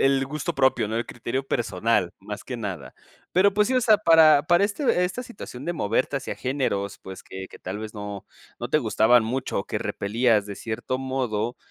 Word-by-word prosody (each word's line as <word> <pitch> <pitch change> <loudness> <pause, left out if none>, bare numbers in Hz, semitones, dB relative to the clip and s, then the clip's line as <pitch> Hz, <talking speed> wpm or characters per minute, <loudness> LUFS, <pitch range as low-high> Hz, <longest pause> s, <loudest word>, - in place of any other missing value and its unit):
el 135 0 +3
gusto 150 +3 -3
propio, 130 -5 +2
¿no? 110 - -2
El 115 - -1
criterio 120 +3 -3
personal, 110 -5 0
más 105 +2 -7
que 125 - -5
nada. 105 -5 -6 0.4
Pero 195 +2 +4
pues, 210 +1 +3
sí 260 - 0
o 255 - +4
sea, 220 -3 +5
para 160 -6 +6
para 175 +5 +4
este 205 -4 +1
esta 185 +8 -3
situación 170 - -9
de 175 - -1
moverte 130 0 0
hacia - - -4
géneros, 105 -7 -2
pues, 95 0 -9
que 95 0 -8
que - - -13
tal 95 +3 -5
vez, 110 0 -7
no 105 -1 -7 0.3
no 120 - -3
te 155 - +3
gustaban 110 -1 +4
mucho, 125 +3 -2
o - - -7
que - - -2
repelías 110 0 +1
de 100 - -6
cierto 115 +4 -4
modo, 125 -4 -2
125 Hz, 205 wpm, -25 LUFS, 105-155 Hz, 0.4 s, para